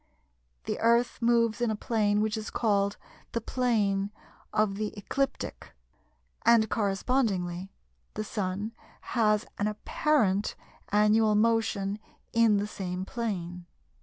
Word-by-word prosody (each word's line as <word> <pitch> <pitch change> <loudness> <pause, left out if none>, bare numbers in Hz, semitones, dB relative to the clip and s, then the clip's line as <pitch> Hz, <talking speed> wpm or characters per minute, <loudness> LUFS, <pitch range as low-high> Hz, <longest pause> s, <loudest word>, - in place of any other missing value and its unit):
The - - -3
Earth 235 +2 +2
moves 230 -1 +2
in 240 - +2
a 215 - 0
plane 210 -1 +1
which 215 0 0
is 220 -1 -4
called 200 -2 +1 0.4
the 230 - +1
"Plane 210 -5 0 0.4
of 210 -2 +2
the 210 +1 -3
Ecliptic," 275 +7 -3 0.7
and 230 -2 +5
correspondingly, 195 -4 0 0.5
the 215 - -2
Sun 205 0 -3 0.4
has 215 -3 +3
an 205 - +1
apparent 210 -1 +1 0.3
annual 210 +1 +4
motion 215 -2 +1 0.3
in 230 -2 +5
the 200 - 0
same 185 -3 -4
plane. 180 -7 -4
210 Hz, 115 wpm, -28 LUFS, 200-230 Hz, 0.7 s, and